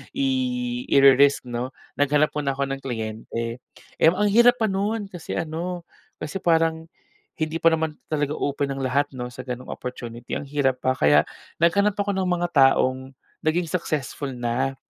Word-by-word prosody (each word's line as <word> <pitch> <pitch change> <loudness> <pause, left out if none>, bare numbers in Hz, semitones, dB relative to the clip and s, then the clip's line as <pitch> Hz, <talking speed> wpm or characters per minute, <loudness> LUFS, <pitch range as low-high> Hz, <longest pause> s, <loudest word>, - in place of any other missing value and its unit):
i 255 -2 -1
i-re-risk 140 0 +5
'no, 120 +2 -4 0.2
naghanap 145 +1 +3
muna 140 -2 0
ako 140 - -1
ng 135 - -3
kliyente. 115 0 -4 0.4
Eh, - - +6
ang 205 +3 +1
hirap 240 +3 +6
pa 220 - +2
no'n 205 +2 -2
kasi 175 -3 -7
ano, 170 +2 -3 0.4
kasi 155 +6 -4
parang 165 -2 +1 0.5
hindi 160 0 -2
pa 165 - +3
naman 160 -2 +1
talaga 150 -2 -1
open 140 -1 -2
ang 135 - -4
lahat 140 +2 0
'no, 125 -2 -5
sa 125 +1 -9
gano'ng 125 0 -6
opportunity. 120 -1 -7
Ang 145 - -8
hirap 135 -3 0
pa. 130 0 +1
Kaya 75 -5 +4 0.3
naghanap 200 +5 +3
ako 200 -1 0
ng 190 - 0
mga 175 -1 0
taong 130 -1 +3 0.3
naging 165 +2 +1
successful 150 -5 -3
na 125 +2 -2
145 Hz, 160 wpm, -24 LUFS, 130-175 Hz, 0.5 s, Eh